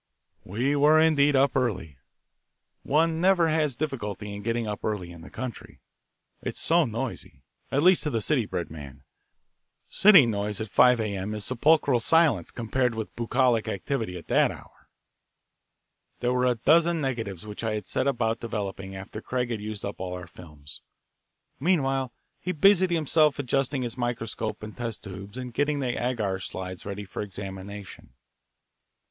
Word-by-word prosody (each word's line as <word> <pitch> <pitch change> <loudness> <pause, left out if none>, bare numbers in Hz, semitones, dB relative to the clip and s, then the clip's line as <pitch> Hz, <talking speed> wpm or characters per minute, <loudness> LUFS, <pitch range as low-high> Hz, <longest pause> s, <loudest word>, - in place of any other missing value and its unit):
We 120 +10 -1
were, 150 +2 +5
indeed, 145 -3 +4
up 135 0 +3
early. 95 - -1 0.8
One 160 +3 +1
never 180 -3 +4
has 155 -4 +1
difficulty 105 -8 -4
in 100 - -6
getting 115 +2 -1
up 105 -1 -5
early 100 -5 -3
in 85 -1 -12
the - - -11
country: 130 -3 -7 0.6
it - - -4
is - - -7
so 170 0 +3
noisy, 115 - -5 0.3
at 140 +2 +1
least 185 0 +6
to 150 -5 -2
a - - +2
city 120 -1 +1
bred 85 -5 -4
man. 70 -4 -10 0.9
City 195 -9 +7
noise 105 -2 -2
at 110 -3 -5
five 125 -1 +5
A.M. 105 -1 -3
is 105 - -4
sepulchral 140 0 +3
silence 165 +5 +3
compared 120 +1 -1
with 110 -1 -5
bucolic 120 -1 +1
activity 110 -2 -3
at 85 - -10
that - - +3
hour. - - -13 1.3
There 125 +1 0
were 125 0 +2
a 125 - +2
dozen 165 +8 +3
negatives 115 - -3
which 105 +1 -7
I 110 -1 -1
set 130 +7 -2
about 115 -4 0
developing 100 -4 -5
after 95 +3 -8
Craig 125 0 -2
had 110 -3 -3
used 105 -1 -6
up 100 - -6
all 90 -1 -4
our 90 -1 -7
films. 75 -5 -12 0.8
Meanwhile, 135 -5 +1 0.3
he 185 - -3
busied 185 +3 +5
himself 155 -2 +3
adjusting 135 0 0
his 120 +1 -4
microscope 115 -3 -3
and 105 0 -8
test 115 -3 -5
tubes 100 +3 -9
and 125 -2 -6
getting 145 +2 0
the 125 -3 -1
agar 110 -7 -1
slides 95 0 -6
ready 100 0 -5
for 95 - -6
examination. 100 -4 -8
115 Hz, 160 wpm, -26 LUFS, 100-140 Hz, 1.3 s, City